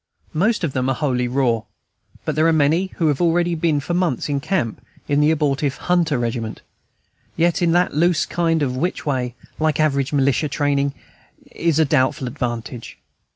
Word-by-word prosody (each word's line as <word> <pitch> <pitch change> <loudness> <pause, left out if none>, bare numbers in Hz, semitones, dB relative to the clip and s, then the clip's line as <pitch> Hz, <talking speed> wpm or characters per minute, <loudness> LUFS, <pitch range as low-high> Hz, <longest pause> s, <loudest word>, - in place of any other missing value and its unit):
Most 210 +7 +1
of 150 -5 -1
them 130 0 0
are 135 - +1
wholly 125 -3 0
raw, 120 -3 +1 0.6
but - - -1
there 155 +1 +3
are - - +4
many 160 +4 +2
who 165 - 0
have 145 +1 0
already 175 0 +2
been 155 -2 +1
for 160 +5 -4
months 175 -7 0
in 140 -1 0
camp 130 - -2 0.2
in 145 0 +2
the 150 - +4
abortive 145 -3 0
"Hunter 170 -5 +1
Regiment," 115 -2 -3 0.7
yet 170 +1 +2
in 170 -1 +3
that 175 +1 +2
loose 165 +2 +2
kind 165 -2 0
of 125 -2 -1
way 130 - -3
which, 175 -1 -2 0.5
like 155 -1 +1
average 140 -3 +1
militia 140 +1 +1
training, 140 0 0 0.6
is 165 -3 0
a 160 - +4
doubtful 130 -2 +1
advantage. 120 -2 -5
145 Hz, 175 wpm, -21 LUFS, 130-165 Hz, 0.7 s, are